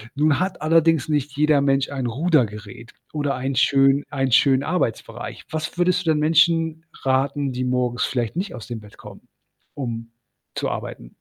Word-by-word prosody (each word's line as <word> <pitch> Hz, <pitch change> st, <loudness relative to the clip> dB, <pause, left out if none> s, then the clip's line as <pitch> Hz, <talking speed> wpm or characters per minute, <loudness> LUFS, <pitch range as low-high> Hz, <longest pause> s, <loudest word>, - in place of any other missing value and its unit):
nun 150 Hz, 0 st, +2 dB
hat 185 Hz, -2 st, -2 dB
allerdings 160 Hz, -2 st, +3 dB
nicht 145 Hz, -2 st, -1 dB
jeder 150 Hz, 0 st, +3 dB
Mensch, 135 Hz, -1 st, +1 dB
ein 135 Hz, -3 st, -3 dB
Rudergerät, 115 Hz, -, -1 dB, 0.2 s
oder 145 Hz, -2 st, -1 dB
ein 130 Hz, +2 st, -3 dB
schön 135 Hz, +1 st, +3 dB
einen 135 Hz, -2 st, -1 dB
schönen 135 Hz, +1 st, +4 dB
Arbeitsbereich. 145 Hz, -9 st, -3 dB
Was 155 Hz, +2 st, -4 dB
würdest 180 Hz, 0 st, +1 dB
du 160 Hz, -, +3 dB
denn 155 Hz, -, +1 dB
Menschen 160 Hz, +1 st, +2 dB, 0.2 s
raten, 135 Hz, +1 st, 0 dB
die 125 Hz, 0 st, -3 dB
morgens 125 Hz, 0 st, 0 dB
vielleicht 120 Hz, +2 st, -2 dB
nicht 190 Hz, -2 st, -3 dB
aus 120 Hz, -, -9 dB
dem 120 Hz, -2 st, -5 dB
Bett 105 Hz, -1 st, -15 dB
kommen, -, -, -13 dB, 0.5 s
um 115 Hz, -4 st, -5 dB, 0.4 s
zu -, -, -1 dB
arbeiten? -, -, -7 dB
140 Hz, 165 wpm, -22 LUFS, 125-155 Hz, 0.5 s, schönen